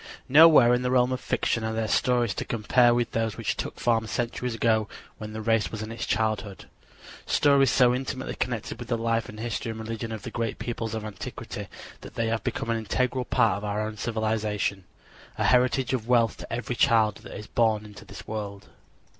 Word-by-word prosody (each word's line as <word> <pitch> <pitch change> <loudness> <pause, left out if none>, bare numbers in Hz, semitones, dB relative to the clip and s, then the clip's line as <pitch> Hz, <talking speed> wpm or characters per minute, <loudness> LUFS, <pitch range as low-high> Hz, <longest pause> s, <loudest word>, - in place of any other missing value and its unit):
Nowhere 150 -4 +7
in 125 - +2
the 125 - -1
realm 125 0 +3
of 130 0 -2
fiction 120 - -1
are 110 0 -2
there 110 0 -1
stories 120 -2 +2
to - - -3
compare 120 +2 +3
with 120 0 0
those 115 -1 -1
which - - -1
took - - -5
form 115 -2 +1
centuries 120 +1 -2
ago 110 -2 +1 0.3
when 110 0 -7
the 110 0 -5
race 115 -1 +2
was 110 -1 -5
in 110 - -6
its 115 - -5
childhood 110 -3 -1 0.6
stories 140 -2 +4
so 125 0 +4
intimately 130 +1 -3
connected 115 -1 -3
with 120 - -7
the 115 - 0
life 115 0 -1
and 105 - -10
history 115 0 -3
and 110 0 -5
religion 115 0 -5
of 110 - -6
the 120 - -6
great 115 -2 -2
peoples 115 -2 -4
of 110 -1 -4
antiquity 105 -2 -7 0.3
that - - -11
they 115 -2 0
have 110 -1 -1
become 115 - -2
an 115 - 0
integral 125 +3 -1
part 115 -7 +2
of 100 - -8
our 105 +1 -1
own 110 0 -5
civilization, 110 -3 -1 0.5
a - - 0
heritage 125 +1 +3
of 115 -3 -2
wealth 120 -2 +3
to - - -10
every 120 +1 -3
child 115 -4 +3
that - - -10
is 105 - -8
born 110 -1 +1
into 105 -2 -12
the 100 - -11
world. 100 -2 -6
115 Hz, 205 wpm, -26 LUFS, 110-120 Hz, 0.6 s, Nowhere